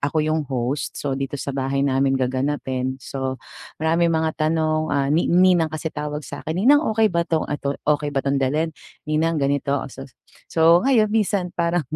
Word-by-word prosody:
ako 145 Hz, +3 st, -2 dB
'yong 155 Hz, -2 st, -1 dB
host. 130 Hz, +2 st, -2 dB
So 140 Hz, -2 st, -3 dB
dito 135 Hz, +1 st, -4 dB
sa 140 Hz, -, -4 dB
bahay 135 Hz, 0 st, -1 dB
namin 135 Hz, 0 st, +2 dB
gaganapin. 130 Hz, 0 st, -2 dB
So 130 Hz, 0 st, -4 dB, 0.4 s
maraming 165 Hz, +2 st, +2 dB
mga 160 Hz, 0 st, 0 dB
tanong, 155 Hz, 0 st, +1 dB
ah, 140 Hz, -1 st, +1 dB
ni 165 Hz, -, +2 dB
ninang 180 Hz, -2 st, +4 dB
kasi 155 Hz, 0 st, -4 dB
tawag 150 Hz, 0 st, -4 dB
sa 145 Hz, +2 st, -8 dB
'kin, 160 Hz, -, -2 dB
"Ninang, 290 Hz, +3 st, +6 dB
okey 220 Hz, -2 st, +3 dB
ba 170 Hz, 0 st, 0 dB
'tong 160 Hz, -1 st, +1 dB
at 145 Hz, -, -2 dB
o 140 Hz, -, 0 dB, 0.2 s
okey 150 Hz, -1 st, -4 dB
ba 135 Hz, -, 0 dB
'tong 140 Hz, 0 st, +1 dB
dalhin? 155 Hz, +5 st, 0 dB, 0.3 s
Ninang 160 Hz, +2 st, 0 dB
ganito." 140 Hz, 0 st, 0 dB
Oh, 140 Hz, -, -4 dB
so 135 Hz, +2 st, -9 dB, 0.4 s
so 165 Hz, +1 st, +5 dB
ngayon 225 Hz, -6 st, +4 dB
minsan 200 Hz, -4 st, 0 dB
parang 170 Hz, 0 st, +1 dB
150 Hz, 190 wpm, -22 LUFS, 135-165 Hz, 0.4 s, Ninang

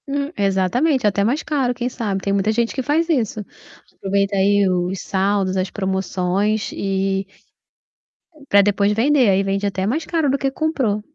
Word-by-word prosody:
Hum, 280 Hz, +1 st, -2 dB
exatamente, 205 Hz, -, +1 dB
até 200 Hz, -1 st, +2 dB
mais 250 Hz, +9 st, 0 dB
caro, 265 Hz, -5 st, -1 dB
quem 245 Hz, 0 st, -3 dB
sabe, 205 Hz, -6 st, -3 dB
tem 200 Hz, -, 0 dB
muita 200 Hz, +2 st, +1 dB
gente 230 Hz, +1 st, 0 dB
que 265 Hz, -, -2 dB
faz 300 Hz, +5 st, +1 dB
isso. 225 Hz, -, -1 dB, 0.5 s
Aproveita 200 Hz, +1 st, -1 dB
aí 200 Hz, +1 st, +3 dB
os 180 Hz, 0 st, -1 dB
saldos, 195 Hz, 0 st, 0 dB
as 185 Hz, 0 st, -1 dB
promoções 190 Hz, +1 st, -1 dB
e 195 Hz, 0 st, -1 dB, 1.2 s
pra 200 Hz, -, +7 dB
depois 200 Hz, 0 st, +2 dB
vender, 250 Hz, +2 st, +3 dB
aí 195 Hz, 0 st, +3 dB
vende 195 Hz, +1 st, -1 dB
até 190 Hz, -1 st, -1 dB
mais 305 Hz, +8 st, -1 dB
caro 320 Hz, -4 st, 0 dB
do 275 Hz, -, +1 dB
que 270 Hz, -1 st, -1 dB
comprou, 265 Hz, -9 st, -1 dB
205 Hz, 165 wpm, -20 LUFS, 195-255 Hz, 1.2 s, pra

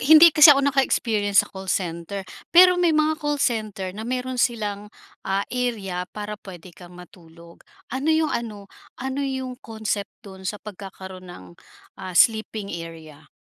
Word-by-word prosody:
hindi 315 Hz, +4 st, +8 dB
kasi 305 Hz, +1 st, +8 dB
ako 280 Hz, -1 st, +7 dB
naka-experience 225 Hz, -7 st, +2 dB
sa -, -, -16 dB
call 190 Hz, 0 st, -9 dB
center, 180 Hz, +2 st, -3 dB, 0.2 s
pero 360 Hz, +1 st, +6 dB
may 345 Hz, -2 st, +3 dB
mga 310 Hz, 0 st, +1 dB
call 295 Hz, -1 st, -1 dB
center 215 Hz, -8 st, -2 dB
na 205 Hz, -, -8 dB
meron 255 Hz, +1 st, -3 dB
silang, 210 Hz, -4 st, -1 dB, 0.4 s
ah, 195 Hz, +1 st, 0 dB
area 205 Hz, -8 st, -3 dB
para 210 Hz, 0 st, -7 dB
puwede 180 Hz, -2 st, -12 dB
kang 175 Hz, 0 st, -14 dB
matulog. 170 Hz, -1 st, -16 dB, 0.3 s
Ano 265 Hz, +4 st, -2 dB
'yong 315 Hz, -1 st, +2 dB
ano, 215 Hz, -4 st, -4 dB, 0.3 s
ano 265 Hz, +2 st, -4 dB
'yong 260 Hz, -2 st, -4 dB
concept 220 Hz, -2 st, -4 dB, 0.2 s
do'n 190 Hz, -1 st, -8 dB
sa 210 Hz, -, -3 dB
pagkakaroon 190 Hz, -2 st, -10 dB
ng, 95 Hz, -, -11 dB, 0.5 s
ah, 185 Hz, -2 st, -6 dB
sleeping 220 Hz, -2 st, +2 dB
area? 160 Hz, -3 st, -9 dB
210 Hz, 150 wpm, -23 LUFS, 185-260 Hz, 0.5 s, hindi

